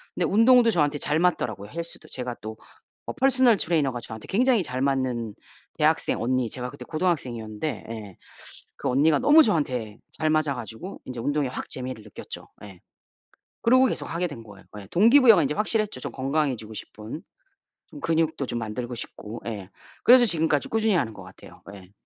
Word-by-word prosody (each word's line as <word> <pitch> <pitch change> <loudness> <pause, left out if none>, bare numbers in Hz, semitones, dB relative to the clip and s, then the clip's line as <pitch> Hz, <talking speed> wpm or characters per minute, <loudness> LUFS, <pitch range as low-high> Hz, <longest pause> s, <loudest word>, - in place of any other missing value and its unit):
근데 - - 0
운동도 230 +2 +5
저한테 150 -5 +1
잘 150 +3 0
맞더라고요 110 - 0
헬스도. 165 +1 -7
제가 125 -2 -5
또 110 +1 -7 0.5
어 - - -3
퍼스널 260 -4 +4
트레이너가 150 -9 0
저한테 110 -1 -9
굉장히 240 0 +3
잘 130 -4 -3
맞는 130 -5 -1 0.4
대학생 - - +1
언니 125 0 0
제가 125 +2 -5
그때 145 - -10
고등학생이었는데 130 - -2
예 105 -5 -8 0.6
그 - - -2
언니가 145 +4 +4
너무 310 +2 +7
저한테 130 - -1
잘 155 - -1
맞아 155 -2 +2
가지고 120 - -8
인제 125 -2 -6
운동에 145 +2 0
확 125 - -6
재미를 130 -3 -4
느꼈죠. 105 - -9 0.2
예. 95 -4 -12 0.8
그러고 255 +3 +5
계속 - - -3
하게 175 +2 -1
된 145 -8 -9
거예요. 100 -3 -14 0.2
예. 100 - -11
동기부여가 230 0 +6
인제 145 - 0
확실했죠 215 - 0
좀 - - -5
건강해지고 135 -5 -1
싶은. 110 +7 -8 0.7
좀 290 - -11
근육도 160 - 0
좀 120 - -3
만들고 120 +3 -4
싶고 110 0 -8
예 100 -5 -6 0.3
그래서 250 0 +8
지금까지 160 -6 0
꾸준히 220 -1 +1
하는 125 -9 0
것 100 - -10
같아요. 95 +1 -15
예. 95 -2 -14
140 Hz, 390 characters per minute, -25 LUFS, 115-180 Hz, 0.8 s, 그래서